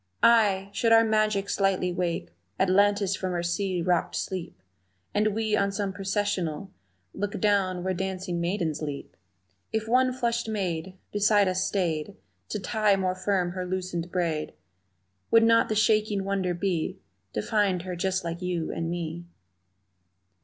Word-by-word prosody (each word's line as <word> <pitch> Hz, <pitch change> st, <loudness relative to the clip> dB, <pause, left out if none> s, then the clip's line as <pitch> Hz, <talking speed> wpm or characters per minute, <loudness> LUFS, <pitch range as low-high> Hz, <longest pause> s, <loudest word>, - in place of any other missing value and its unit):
Ay, 200 Hz, -4 st, +4 dB
should 230 Hz, -, +1 dB
our 225 Hz, 0 st, +7 dB
magic 215 Hz, -2 st, +1 dB
straightly 190 Hz, -2 st, +1 dB
wake 175 Hz, -, -2 dB, 0.3 s
Atlantis 200 Hz, +1 st, +3 dB
from 185 Hz, -1 st, -3 dB
her 175 Hz, -1 st, -1 dB
sea 175 Hz, 0 st, -1 dB
rocked 175 Hz, -1 st, +1 dB
sleep 175 Hz, -, -4 dB, 0.5 s
And 210 Hz, 0 st, +1 dB
we 220 Hz, -1 st, +1 dB
on 200 Hz, -1 st, +1 dB
some 195 Hz, -1 st, -2 dB
Processional 195 Hz, -3 st, -2 dB, 0.4 s
Look 205 Hz, -1 st, -3 dB
down 190 Hz, -3 st, +1 dB
where 190 Hz, 0 st, 0 dB
dancing 185 Hz, -1 st, -3 dB
maidens 170 Hz, -4 st, -1 dB
leap, 145 Hz, -2 st, -6 dB, 0.6 s
If 220 Hz, 0 st, -1 dB
one 255 Hz, +2 st, +3 dB
flushed 235 Hz, -2 st, -1 dB
maid 185 Hz, -3 st, -3 dB
Beside 205 Hz, -1 st, +3 dB
us 185 Hz, 0 st, +1 dB
stayed 180 Hz, -2 st, -1 dB, 0.3 s
To 210 Hz, -, -2 dB
tie 210 Hz, +1 st, +2 dB
more 185 Hz, -1 st, 0 dB
firm 185 Hz, -1 st, 0 dB
her 185 Hz, 0 st, -4 dB
loosened 180 Hz, -2 st, -3 dB
braid 165 Hz, -4 st, -1 dB, 0.8 s
Would 230 Hz, 0 st, +6 dB
not 230 Hz, 0 st, +4 dB
the 215 Hz, -, 0 dB
shaking 215 Hz, -2 st, +2 dB
wonder 190 Hz, -2 st, -1 dB
be 175 Hz, -3 st, -1 dB, 0.4 s
To 105 Hz, -, -1 dB
find 195 Hz, -5 st, +1 dB
her 180 Hz, -1 st, -4 dB
just 190 Hz, +1 st, -1 dB
like 170 Hz, +1 st, -4 dB
you 175 Hz, -3 st, -2 dB
and 165 Hz, 0 st, -3 dB
me? 170 Hz, 0 st, -4 dB
190 Hz, 150 wpm, -27 LUFS, 175-205 Hz, 0.8 s, our